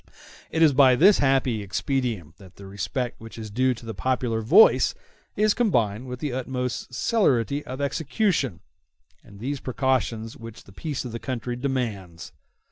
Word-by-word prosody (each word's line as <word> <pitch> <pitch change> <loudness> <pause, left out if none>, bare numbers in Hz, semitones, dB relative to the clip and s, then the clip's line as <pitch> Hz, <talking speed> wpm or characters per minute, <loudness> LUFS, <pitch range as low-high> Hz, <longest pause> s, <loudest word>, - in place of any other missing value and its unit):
It 165 - +2
is 150 -3 +5
by 130 -2 +6
this 190 +9 +6
happy 135 -5 +2
expedient 100 - -3
that 95 -3 -15
the 100 - -12
respect 105 +6 -4
which 115 0 -11
is 110 -2 -7
due 130 +3 +1
to 115 - -13
the 110 - -5
popular 120 +2 -1
voice 115 - +5 0.4
is 215 0 +3
combined 120 - 0
with 125 0 -6
the 145 -4 -2
utmost 125 -1 -3
celerity 140 - +1
of 130 +1 -6
execution 140 - -1 0.6
and 100 -1 -15
those 135 +5 -3
precautions 125 -4 -1
which 115 -1 -11
the 95 - -17
peace 145 - -4
of 125 - -5
the 115 - -5
country 125 -1 -4
demands. 115 -10 -4
125 Hz, 160 wpm, -25 LUFS, 110-135 Hz, 0.6 s, by